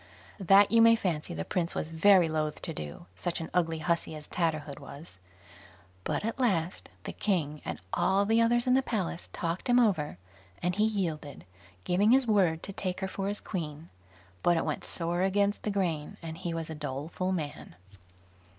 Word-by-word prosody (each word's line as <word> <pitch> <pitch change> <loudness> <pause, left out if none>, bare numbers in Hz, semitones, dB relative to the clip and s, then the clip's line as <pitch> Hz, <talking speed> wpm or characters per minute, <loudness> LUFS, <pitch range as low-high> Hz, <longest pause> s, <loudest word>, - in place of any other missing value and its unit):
That 195 +2 +6
you 230 0 +6
may 230 0 +8
fancy 165 - -2
the 80 - -3
prince 175 -2 -1
was 160 - -3
very 180 +1 +5
loath 155 -1 -2
to 165 - -3
do, 75 - -7
such 170 - -3
an 165 - -6
ugly 165 -2 +1
hussy 165 0 -1
as 150 -1 -9
Tatterhood 155 -5 -2
was; 140 - -11 0.8
but - - -2
at 230 +3 -3
last 185 -9 0
the - - -5
king 155 -7 -1
and - - -5
all 195 +1 +3
the 225 +2 +3
others 240 +1 +3
in 250 - +3
the 265 - +5
palace 190 -9 -3
talked 170 +7 -3
him 245 0 +6
over, 180 - +1 0.4
and 180 +1 0
he 210 +3 +2
yielded, 165 - -3 0.4
giving 195 +4 +2
his 265 0 +5
word 185 -7 +2
to 195 - -6
take 185 -1 -3
her 190 - -1
for 195 +1 -4
his 205 +1 -3
queen; 160 -4 -5 0.5
but 175 -1 +3
it - - 0
went - - -2
sore 175 +1 -2
against 200 +2 +1
the - - -2
grain, 170 -7 -1
and 165 0 -6
he 175 -3 -3
was 165 -1 -4
a - - -3
doleful 150 +5 -3
man. 150 - -4
175 Hz, 185 wpm, -29 LUFS, 160-200 Hz, 0.8 s, may